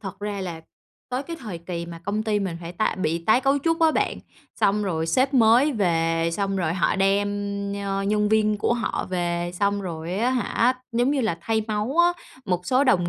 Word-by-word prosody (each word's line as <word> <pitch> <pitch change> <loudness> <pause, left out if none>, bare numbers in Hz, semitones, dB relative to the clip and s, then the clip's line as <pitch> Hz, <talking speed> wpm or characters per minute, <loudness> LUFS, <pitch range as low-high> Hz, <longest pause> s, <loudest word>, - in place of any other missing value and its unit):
Thật 195 -1 -7
ra 205 -1 -3
là 170 -3 -5 0.5
tới 255 +1 -2
cái 335 +3 -7
thời 210 -8 -6
kỳ 170 0 -5
mà 170 -1 -8
công 210 +2 -1
ty 215 -1 0
mình 185 -4 -3
phải 170 0 -7
tái 185 +3 0
bị 160 +2 +1
tái 220 +6 +4
cấu 275 +2 +2
trúc 330 +3 0
á 320 - +5
bạn. - - 0 0.4
Xong 210 +1 +3
rồi 165 -5 -1
sếp 265 - +1
mới 245 +4 +5
về, 165 -5 +1
xong 195 +2 -1
rồi 170 -4 0
họ 185 - +1
đem, 195 +1 +2 0.6
ơ, 195 0 -1
nhân 210 +1 +1
viên 215 -1 +2
của 235 - +1
họ 235 - -2
về, 175 -1 -1
xong 200 +2 0
rồi 170 -2 -5
á 230 +6 +1
hả, 250 0 +1 0.2
giống 245 +3 +2
như 290 - +1
là 215 -9 -1
thay 220 +5 0
máu 215 +7 -2
á. 345 0 +6 0.3
Một 180 -1 -2
số 260 +2 +3
đồng 180 -10 +3
205 Hz, 215 wpm, -24 LUFS, 175-235 Hz, 0.6 s, á